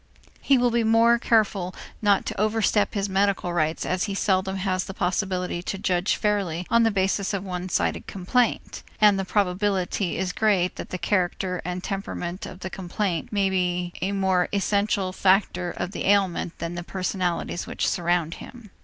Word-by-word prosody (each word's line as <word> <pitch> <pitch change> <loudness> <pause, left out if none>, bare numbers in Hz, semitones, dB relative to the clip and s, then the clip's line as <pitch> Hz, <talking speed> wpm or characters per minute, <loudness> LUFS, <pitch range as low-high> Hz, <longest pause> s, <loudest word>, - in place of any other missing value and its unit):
He 275 - +4
will 245 -1 +2
be 235 0 +2
the 220 - +1
more 230 +1 +5
careful 200 -6 +1 0.3
not 205 -2 +3
to 215 -2 -3
overstep 215 -1 +1
his 200 0 0
medical 195 -2 +1
rights 160 -1 0
as 185 0 0
he 200 -2 -4
seldom 190 -1 +1
has 185 -1 -1
the 195 - -8
possibility 180 -1 -1
to 195 - -4
judge 185 -1 +1
fairly 195 -5 -1
on 235 - +5
the 225 - +4
basis 195 0 0
of 195 - -3
the 195 - -8
one 180 0 -4
sided - - -1
complaint, 220 +6 0 0.2
and 210 -2 +5
the - - 0
probability 190 -1 0
is 180 0 -2
great 195 -5 +2
that - - -6
the 185 - -3
character 180 0 -1
and 180 0 -4
temperament 195 -3 -4
of 185 0 -11
the 185 - -4
complainant 180 -2 -3
may 200 -2 +1
be 180 -1 -1
a 190 +2 0
more 190 -2 +1
essential 200 -1 0
factor 185 -2 +2
of 175 - -4
the - - -4
ailment 195 -4 +1
than 170 0 -4
the 175 - -4
personalities 180 -1 -2
which - - -1
surround 175 -2 0
him. 235 -5 -12
190 Hz, 180 wpm, -25 LUFS, 180-205 Hz, 0.3 s, more